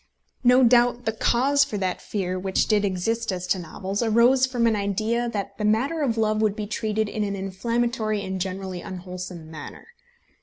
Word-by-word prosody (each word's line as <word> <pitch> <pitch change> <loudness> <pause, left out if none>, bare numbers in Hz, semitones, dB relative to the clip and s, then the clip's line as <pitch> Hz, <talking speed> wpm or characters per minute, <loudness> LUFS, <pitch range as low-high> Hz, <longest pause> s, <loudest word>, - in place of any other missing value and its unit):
No 250 +1 +6
doubt 245 0 +4
the 220 - +1
cause 265 +6 +3
for 250 -7 -4
that 185 -2 -2
fear 185 -3 -3
which 190 0 +1
did 210 -2 +2
exist 215 +4 -1
as 180 -1 -4
to 185 +1 0
novels 190 +5 -4
arose 240 +3 +4
from 245 -2 0
an 225 -1 +3
idea 215 +4 -1
that 200 -3 -4
the - - -2
matter 250 +10 +1
of 240 -6 0
love 215 -1 +1
would 210 -2 +2
be 215 -1 -4
treated 215 0 -1
in 215 +1 -2
an 200 -1 -2
inflammatory 215 +2 -1
and 190 -1 -4
generally 190 -1 -4
unwholesome 180 -3 -7
manner. 160 - -10
215 Hz, 185 wpm, -24 LUFS, 190-235 Hz, -, No